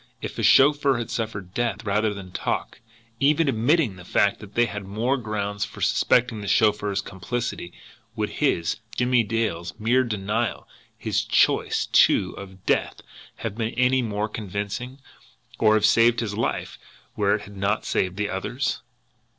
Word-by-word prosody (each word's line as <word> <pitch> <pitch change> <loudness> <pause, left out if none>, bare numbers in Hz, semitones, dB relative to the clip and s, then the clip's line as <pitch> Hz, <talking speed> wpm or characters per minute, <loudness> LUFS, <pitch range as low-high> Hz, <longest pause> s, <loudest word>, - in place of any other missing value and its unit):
If - - -5
the - - -3
chauffeur 140 -1 +5
had 120 0 -4
suffered 110 -5 -4
death 120 -1 -2
rather 105 +1 +1
than 95 -3 -8
talk, - - -3 0.4
even 150 +3 +3
admitting 125 - +2
the 90 - -11
fact 100 +3 +1
that 105 -1 -13
they 120 - +4
had 105 -2 -5
more 110 +7 -1
grounds 105 -4 -3
for - - -7
suspecting 115 -3 +2
the 100 - -6
chauffeur's 105 -1 +2
complicity, 100 -1 -4 0.4
would - - -2
his, 85 0 +1 0.2
Jimmie 125 0 +3
Dale's, 105 -6 -2
mere 120 +4 +3
denial, 110 0 -2 0.3
his - - -1
choice, - - +2
too, - - +4
of 95 -1 -11
death, - - 0 0.3
have - - -5
been 115 0 -3
any 125 +1 +3
the 120 - -2
more 105 0 -2
convincing, 105 +5 -5 0.6
or 110 -1 +5
have 110 - +3
saved 115 0 +4
his 110 -4 -2
life 115 +3 -3 0.3
where 100 -1 +2
it 105 - -5
had 100 -1 -12
not 100 +2 -1
saved 90 0 -1
the 105 0 0
other's? 120 +9 -2
110 Hz, 160 wpm, -24 LUFS, 100-120 Hz, 0.6 s, chauffeur